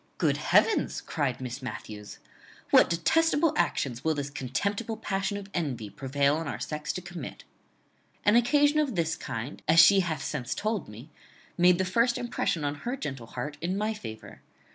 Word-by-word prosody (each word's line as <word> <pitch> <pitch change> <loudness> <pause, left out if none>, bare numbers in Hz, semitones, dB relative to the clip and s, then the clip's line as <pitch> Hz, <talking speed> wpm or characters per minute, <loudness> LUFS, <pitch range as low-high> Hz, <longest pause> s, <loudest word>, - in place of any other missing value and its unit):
"Good - - +2
heavens!" 445 - +2
cried 140 -6 -2
Miss 130 +1 -6
Matthews; 105 -4 -7 0.5
"what - - +7
detestable 295 - +2
actions 125 - 0
will 160 -1 +1
this 145 -1 -4
contemptible 200 - -2
passion 195 +1 -2
of 200 -1 -8
envy 130 - -3
prevail 140 +6 +1
on 165 -1 -4
our - - -4
sex 150 0 -3
to 185 - -5
commit!" 175 -6 -8 0.8
"An 205 - +5
occasion 290 +5 +4
of 280 -7 0
this 165 -2 0
kind, 115 +5 -6
as 160 +2 +6
she 195 +4 +8
hath 160 -7 -1
since 130 -4 -3
told 215 - -2
me, 115 +9 -11 0.4
made 180 0 +5
the 190 - 0
first 235 +6 +2
impression 235 -9 -1
on 145 - 0
her 245 +3 -3
gentle 135 - -5
heart 145 +6 -5
in 180 +3 -1
my 215 +2 0
favour. 110 - -9
165 Hz, 170 wpm, -28 LUFS, 135-210 Hz, 0.8 s, she